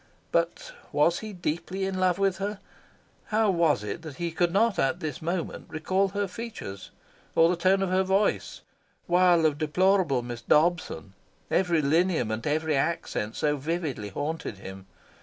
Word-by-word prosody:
But 170 0 -1 0.2
was 165 +4 +3
he 215 -1 -7
deeply 180 +1 -3
in 190 -1 -2
love 185 -1 +2
with 195 -1 +1
her? 205 +1 -2 0.7
How 215 -1 +2
was 165 - +2
it 105 +9 -5
that 155 -4 -8
he 170 +2 -3
could 175 +1 +1
not 215 +3 +2
at 135 +6 +1
this 155 -4 -5
moment 170 +1 -3
recall 185 +5 0
her 200 +1 -2
features, 180 - -7 0.5
or 165 +1 +6
the 180 - +2
tone 190 +3 +2
of 185 - -1
her 185 +1 +3
voice, 195 +2 0 0.4
while 175 -2 +4
of 150 -1 +1
deplorable 160 -3 +2
Miss 120 -1 -6
Dobson, 150 - +1 0.4
every 175 -4 +2
lineament, 140 -8 +1
every 155 +1 +1
accent, 135 -7 -1
so 150 -1 +1
vividly 145 -7 -3
haunted 145 -1 -4
him? 95 0 -10
170 Hz, 160 wpm, -27 LUFS, 150-190 Hz, 0.7 s, or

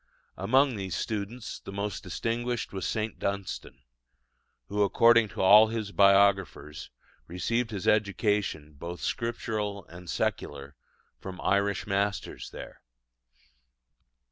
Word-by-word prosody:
Among 130 +7 +3
these 95 -3 -4
students 110 +2 -4
the - - -9
most 100 0 -3
distinguished 120 0 -3
was 95 - -3
St. 110 -1 -3
Dunstan, 100 -9 -4 0.8
who, 105 +1 -2
according 115 +3 +5
to 100 - -4
all 105 +3 +8
his 110 -2 -4
biographers, 100 -6 +3 0.4
received 115 +7 -1
his 100 -5 -5
education, 100 -7 +1
both 85 +5 -7
Scriptural 110 -4 -3
and 90 0 -12
secular, 70 0 -3 0.4
from 95 -1 -8
Irish 100 +1 +1
masters 100 -1 -2
there. - - -10
100 Hz, 110 wpm, -28 LUFS, 95-110 Hz, 0.8 s, all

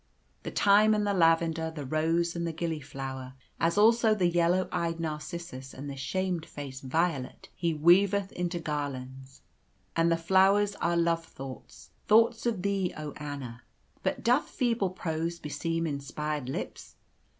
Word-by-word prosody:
The - - -5
thyme 210 +2 +5
and 210 -1 0
the 205 - +1
lavender, 165 -2 +3
the 155 -3 -7
rose 165 +4 +1
and 170 0 -2
the - - -1
gilliflower, 135 -5 -5 0.2
as 170 +3 +1
also 225 +1 +5
the 190 -4 +1
yellow 175 +2 +2
eyed 165 -1 -1
narcissus 155 -3 -6
and 140 +2 -7
the 140 - -5
shamefaced 145 -4 -3
violet 140 -1 -1
he 170 -2 -1
weaveth 195 +5 +4
into 175 0 -2
garlands. 135 -4 -5 0.5
And 165 0 +3
the 165 - +3
flowers 195 +4 +4
are 170 0 +1
love 170 0 +2
thoughts 135 -4 -10 0.2
thoughts 230 +2 +4
of 215 -6 -1
thee, 200 -2 0
oh, 150 -1 -5
Anna! 140 -5 -6 0.4
But - - -2
doth 250 +6 +3
feeble 230 -6 0
prose 170 -2 -3
beseem 165 +2 -2
inspired 150 -1 -3
lips? - - -6
165 Hz, 145 wpm, -29 LUFS, 145-185 Hz, 0.5 s, thyme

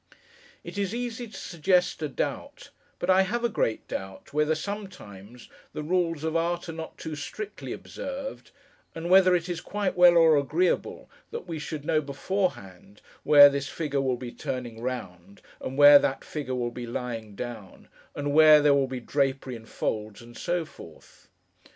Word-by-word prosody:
It - - -7
is 200 +2 -1
easy 240 0 -4
to 215 - -11
suggest 180 +1 0
a 155 - -1
doubt, - - -5 0.3
but 175 - -4
I 190 0 +5
have 230 +5 -1
a 235 - +2
great 115 - -1
doubt 95 +5 -7
whether, 150 +1 +2
sometimes, 150 - -8 0.3
the 150 - -5
rules 165 -2 0
of 160 0 -2
art 170 +1 -1
are - - -4
not 160 0 -8
too 155 - -6
strictly 405 - -7
observed, 275 0 -7 0.5
and 165 +2 -4
whether 185 -1 +6
it 175 0 -1
is 175 -2 -4
quite 200 -2 -2
well 175 -1 +7
or 160 -2 +6
agreeable 155 +6 0 0.2
that 465 - -6
we 165 -2 -5
should 150 -1 -6
know 155 -2 +2
beforehand, 140 - -4 0.2
where 145 -1 +9
this 140 -1 -2
figure 145 -4 -2
will 130 -2 0
be 120 -1 -7
turning 125 -5 -6
round, 100 -7 -6 0.2
and 130 - -6
where 145 0 +9
that 135 - -2
figure 140 -4 -4
will 120 -1 -2
be 120 0 -7
lying 115 -3 -5
down, 110 -4 -8 0.3
and 145 0 -2
where 155 0 +8
there 145 -1 +4
will 140 -1 +2
be 130 -1 -5
drapery 135 0 -1
in 110 -1 -12
folds, 105 -1 -4
and 120 0 -14
so 175 -1 -2
forth. 80 - -16
150 Hz, 175 wpm, -27 LUFS, 125-175 Hz, 0.5 s, where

